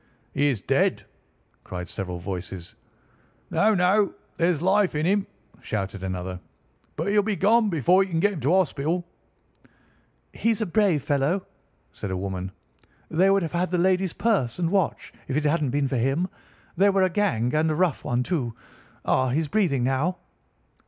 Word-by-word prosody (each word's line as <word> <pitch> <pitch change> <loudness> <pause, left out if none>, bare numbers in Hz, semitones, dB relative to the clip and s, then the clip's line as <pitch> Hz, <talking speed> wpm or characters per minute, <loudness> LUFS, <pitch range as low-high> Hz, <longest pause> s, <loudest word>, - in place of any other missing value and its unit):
"He 145 +1 +2
is 125 -8 0
dead," - - +1 0.6
cried 90 -1 -6
several 90 0 -5
voices. 90 -1 -6 0.8
"No, 215 +1 +3
no, 190 +2 +3 0.2
there's 170 -2 +2
life 190 +1 +2
in 150 +1 0
him!" 195 +2 +1 0.3
shouted 100 -2 -4
another. 95 -1 -4 0.6
"But - - -2
he'll 205 0 +4
be 210 0 -1
gone 215 +5 +3
before 175 +3 +3
you 190 - -7
can 165 -2 0
get 205 +4 +2
him 175 - -5
to 140 +3 +1
hospital." 175 -1 +1 1.3
"He's 225 -2 0
a 220 - 0
brave 185 -6 +2
fellow," 145 +7 0 0.5
said 100 - -6
a 95 - -2
woman. 95 -1 -4 0.6
"They 185 +4 +4
would 195 -1 +3
have 165 - -3
had 175 +1 0
the 180 - 0
lady's 185 0 +2
purse 195 - 0
and 170 -2 0
watch 195 -4 0
if 135 - -1
it 155 - 0
hadn't 150 -2 +1
been 140 +2 0
for 130 -1 -1
him. 135 +9 +1 0.5
They 200 +2 +4
were 195 -1 +3
a 185 - +3
gang, 125 - 0
and 155 +1 +2
a 155 - 0
rough 175 -3 +1
one, 125 +1 0
too. 125 -8 -2 0.5
Ah, 130 0 +2
he's 150 +4 0
breathing 165 - +1
now." 135 +8 0
160 Hz, 170 wpm, -25 LUFS, 125-190 Hz, 1.3 s, he'll